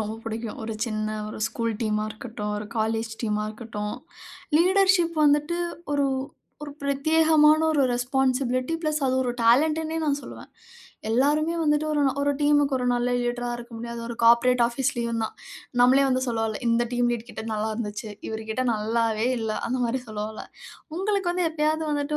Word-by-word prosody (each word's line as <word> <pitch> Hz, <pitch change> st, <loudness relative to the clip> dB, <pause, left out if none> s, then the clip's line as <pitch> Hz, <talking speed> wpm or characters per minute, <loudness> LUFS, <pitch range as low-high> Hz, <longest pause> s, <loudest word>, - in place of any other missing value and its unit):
ரொம்ப 215 Hz, +1 st, -3 dB
பிடிக்கும். 225 Hz, 0 st, -5 dB
ஒரு 225 Hz, -, -3 dB
சின்ன 215 Hz, -1 st, -2 dB, 0.2 s
1 215 Hz, -, -7 dB
ஸ்கூல் 230 Hz, -1 st, -2 dB
டீமா 215 Hz, -1 st, 0 dB
இருக்கட்டும், 215 Hz, -1 st, -6 dB
1 210 Hz, -, -6 dB
காலேஜ் 225 Hz, +1 st, -1 dB
டீமா 210 Hz, -1 st, 0 dB
இருக்கட்டும், 215 Hz, -2 st, -5 dB, 0.6 s
லீடர்ஷிப் 370 Hz, -2 st, +3 dB
வந்துட்டு 295 Hz, +4 st, +2 dB, 0.3 s
ஒரு 285 Hz, -1 st, +2 dB, 0.6 s
ஒரு 295 Hz, -, -6 dB
பிரத்யேகமான 310 Hz, +2 st, +4 dB
ஒரு 290 Hz, -, +3 dB
ரெஸ்பான்சிபிலிட்டி 255 Hz, +2 st, 0 dB
ப்ளஸ் 305 Hz, -1 st, 0 dB
அது 260 Hz, -, +1 dB
ஒரு 250 Hz, -, -1 dB
டேலண்ட்டுனே 310 Hz, +7 st, +3 dB
நான் 290 Hz, -2 st, +1 dB
சொல்லுவேன். -, -, -11 dB, 0.6 s
எல்லாருமே 295 Hz, +7 st, +2 dB
வந்துட்டு 300 Hz, 0 st, +2 dB
ஒரு 295 Hz, -, +1 dB
நா 270 Hz, -, +2 dB
ஒரு 285 Hz, 0 st, +2 dB
டீம்‌க்கு 290 Hz, -1 st, +3 dB
ஒரு 250 Hz, -, -2 dB
நல்ல 245 Hz, 0 st, 0 dB
லீடரா 245 Hz, 0 st, -2 dB
இருக்க 240 Hz, 0 st, -11 dB
முடியாது. 235 Hz, 0 st, -6 dB
ஒரு 235 Hz, -, -4 dB
கார்ப்பரேட் 235 Hz, +1 st, +5 dB
ஆபீஸ்லயும் 235 Hz, -2 st, -1 dB
தான். 220 Hz, -, -6 dB, 0.5 s
நம்மளே 260 Hz, +3 st, +6 dB
வந்து 255 Hz, 0 st, +1 dB
சொல்லவல்ல 225 Hz, -2 st, -1 dB
இந்த 230 Hz, +1 st, +3 dB
டீம் 245 Hz, 0 st, +2 dB
லீட் 235 Hz, 0 st, -5 dB
கிட்ட -, -, -7 dB
நல்லருந்துச்சு. 215 Hz, 0 st, -3 dB, 0.2 s
இவருகிட்ட 220 Hz, +2 st, -3 dB
நல்லாவே 220 Hz, +1 st, 0 dB
இல்ல, 225 Hz, -1 st, -2 dB, 0.2 s
அந்த 250 Hz, -, 0 dB
மாரி 240 Hz, +2 st, -1 dB
சொல்வோல. 215 Hz, 0 st, -5 dB, 0.5 s
உங்களுக்கு 390 Hz, -1 st, 0 dB
வந்து 355 Hz, -1 st, 0 dB
எப்பயாவது 315 Hz, 0 st, 0 dB
வந்துட்டு 290 Hz, +1 st, -1 dB
245 Hz, 155 wpm, -25 LUFS, 225-295 Hz, 0.6 s, நம்மளே